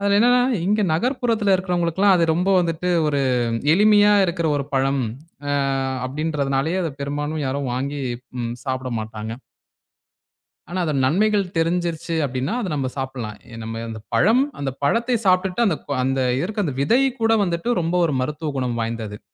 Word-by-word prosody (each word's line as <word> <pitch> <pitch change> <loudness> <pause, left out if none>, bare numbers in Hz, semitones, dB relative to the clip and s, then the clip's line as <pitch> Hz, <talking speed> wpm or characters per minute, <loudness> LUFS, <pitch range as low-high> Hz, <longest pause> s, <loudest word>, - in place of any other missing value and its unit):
அதுல 200 0 +2
என்னன்னா 245 +2 +5 0.2
இங்க 210 +2 +2
நகர்புறத்துல 225 - +1
இருக்கிறவங்களுக்கு 180 -1 -1
எல்லாம் 200 -2 +6
அது 165 - +3
ரொம்ப 180 +3 0
வந்துட்டு 170 +1 -1 0.2
ஒரு 145 -2 +1 0.5
எளிமையா 210 +1 +5
இருக்கிற 170 -2 -1
ஒரு 140 - -3
பழம் 135 0 +1 0.5
அ - - 0 0.6
அப்படின்றதுனாலேயே 145 +3 -1
அத 165 - -2
பெரும்பாலும் 145 +2 -3
யாரும் 135 0 -2
வாங்கி 140 +3 -3 0.4
ம் 115 0 -3
சாப்பிட 130 -1 -3
மாட்டாங்க. 110 0 -6 1.4
ஆனா 180 +3 -4
அதன் 145 -4 0
நன்மைகள் 205 +6 +2
தெரிஞ்சிருச்சு 170 0 -1
அப்டின்னா 130 - -2
அத 205 - -3
நம்ம 135 -3 -1
சாப்பிடலாம். 130 -5 -5 0.2
நம்ம 115 +1 -5
அந்தப் 110 -1 -8
பழம் 230 +7 +4 0.2
அந்தப் 135 -1 -4
பழத்தை 235 - +2
சாப்பிட்டுட்டு 185 +4 +2
அந்த 175 -7 +1
கொ - - -4
அந்த 135 +1 0 0.2
இருக்க 205 +3 -2
அந்த 140 - -3
விதை 230 - +3 0.2
கூட 225 0 +3
வந்துட்டு 175 +7 -1
ரொம்ப 165 +1 -1
ஒரு 150 - -1
மருத்துவ 150 +3 -3
குணம் 125 -2 -1
வாய்ந்தது. 115 -2 -4
160 Hz, 155 wpm, -22 LUFS, 135-195 Hz, 1.4 s, எல்லாம்